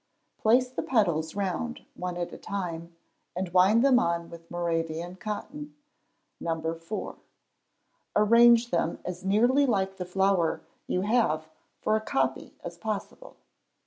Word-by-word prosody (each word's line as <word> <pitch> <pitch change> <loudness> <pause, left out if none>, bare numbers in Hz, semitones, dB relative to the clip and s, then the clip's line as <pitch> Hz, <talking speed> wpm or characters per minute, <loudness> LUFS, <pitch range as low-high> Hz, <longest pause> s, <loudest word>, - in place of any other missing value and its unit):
Place 245 +4 +4
the - - -3
petals 170 -10 +1
round, 200 +5 -3
one 180 -1 -5
at 175 -1 -5
time, 170 -4 -5 0.4
and 185 0 -2
wind 200 +7 +5
them 260 -3 +6
on 170 -3 -1
with 165 0 -12
Moravian 170 0 -2
cotton, 290 +9 -6 0.6
No. 165 -1 -2
4. 165 +6 -6 1.0
Arrange 235 +2 +6
them 170 -1 0
as 180 0 -5
nearly 240 +9 +3
like 195 -4 0
the 180 - -4
flower 190 -2 +1 0.3
you 180 - 0
have 190 -8 +1 0.3
for 215 - +2
a 220 - 0
copy 135 -10 -1
as 170 0 -7
possible. 220 - -5
190 Hz, 130 wpm, -28 LUFS, 170-220 Hz, 1.0 s, them